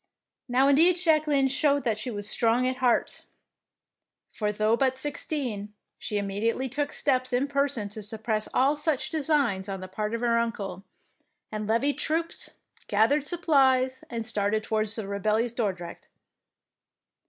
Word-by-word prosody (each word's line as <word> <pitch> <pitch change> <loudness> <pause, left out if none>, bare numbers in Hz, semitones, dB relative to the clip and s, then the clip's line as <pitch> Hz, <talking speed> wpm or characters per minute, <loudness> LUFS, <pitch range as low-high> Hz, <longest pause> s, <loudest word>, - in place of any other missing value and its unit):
Now 260 +2 +3
indeed 330 +6 +5
Jacqueline 305 -5 +3
showed 280 +1 +2
that 220 -4 0
she 250 - -3
was 205 -3 -5
strong 235 +3 +2
at 255 0 -1
heart, 250 -2 +1 1.1
for 210 -1 -1
though 215 +2 +2
but 260 +1 +1
sixteen, 255 -7 -3 0.2
she 210 - -3
immediately 205 +6 -1
took 285 +3 -2
steps 255 -2 0
in 250 +3 +1
person 280 -6 0
to 215 +2 -8
suppress 215 +1 -3
all 275 +3 +3
such 295 -2 -1
designs 280 - 0
on 195 -1 -4
the 185 - -7
part 210 +4 -3
of 230 - -4
her 235 -1 +2
uncle, 200 -5 -3 0.7
and 215 -1 -4
levied 245 +6 +1
troops, 330 +1 -1 0.4
gathered 270 +8 +2
supplies, 265 -7 +2
and 230 -2 -4
started 215 -1 0
towards 215 0 -1
rebellious 215 +3 -1
Dordrecht. 185 -7 -4
240 Hz, 140 wpm, -27 LUFS, 215-280 Hz, 1.1 s, indeed